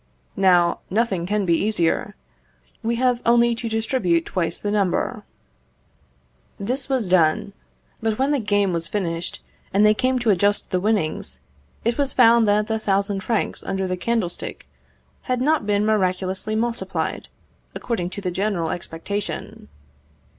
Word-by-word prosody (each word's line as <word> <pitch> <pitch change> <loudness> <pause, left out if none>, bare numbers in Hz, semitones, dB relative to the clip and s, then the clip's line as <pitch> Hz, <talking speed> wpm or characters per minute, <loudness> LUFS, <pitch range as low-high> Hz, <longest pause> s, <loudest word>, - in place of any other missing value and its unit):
Now, 180 -3 +4
nothing 195 -4 0
can 205 0 0
be 170 - +3
easier; 205 +1 0 0.7
we 235 0 0
have 250 0 +1
only 235 0 +4
to 230 0 -4
distribute 220 -7 +1
twice 175 -3 -2
the 205 - -3
number." 200 -4 0 1.4
This 250 +7 -2
was 260 -5 +1
done; 175 +1 +2 0.5
but 220 -1 0
when 270 +2 +1
the 290 - +2
game 205 -3 +1
was 170 0 -2
finished, 170 -4 -3 0.3
and 200 +2 +4
they 210 - +6
came 255 +4 +1
to 235 -3 +2
adjust 205 +2 +1
the 185 - +1
winnings, 170 - -1 0.5
it 235 +4 0
was 280 -1 0
found 235 -2 +6
that 210 +1 +3
the 220 0 -1
thousand 200 -1 0
francs 220 +2 -1
under 190 0 -2
the 185 0 -1
candlestick 185 - -3 0.6
had 250 -1 +1
not 290 -4 +1
been 205 0 +2
miraculously 190 0 0
multiplied, 235 +1 -2 0.5
according 195 -8 -2
to 200 - -6
the 185 -2 -2
general 185 -3 -1
expectation. 185 +4 -5
205 Hz, 145 wpm, -22 LUFS, 185-230 Hz, 1.4 s, they